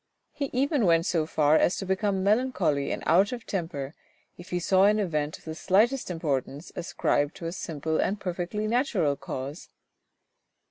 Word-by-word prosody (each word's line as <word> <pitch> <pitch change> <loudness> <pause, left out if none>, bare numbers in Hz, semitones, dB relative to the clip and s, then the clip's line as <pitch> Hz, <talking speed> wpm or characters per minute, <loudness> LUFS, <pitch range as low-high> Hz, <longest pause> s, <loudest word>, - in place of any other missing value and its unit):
He 285 - -3
even 270 - +1
went 165 0 +4
so 160 -4 0
far 150 -1 +3
as 175 - +2
to 195 - -4
become 190 0 0
melancholy 200 - +1
and - - -4
out 190 +5 +4
of 245 -2 -6
temper 160 -7 -4 0.4
if 175 - -12
he 180 - -1
saw 190 +2 +4
an 210 +1 +4
event 155 -7 -1
of - - -22
the 160 - -5
slightest 220 +11 +2
importance 150 -2 -3
ascribed 145 -3 0
to 170 - -8
a 165 - -2
simple 160 -3 -3
and 200 +1 0
perfectly 180 +3 -3
natural 215 - +1
cause. 140 +4 -6
175 Hz, 170 wpm, -27 LUFS, 155-205 Hz, 0.4 s, went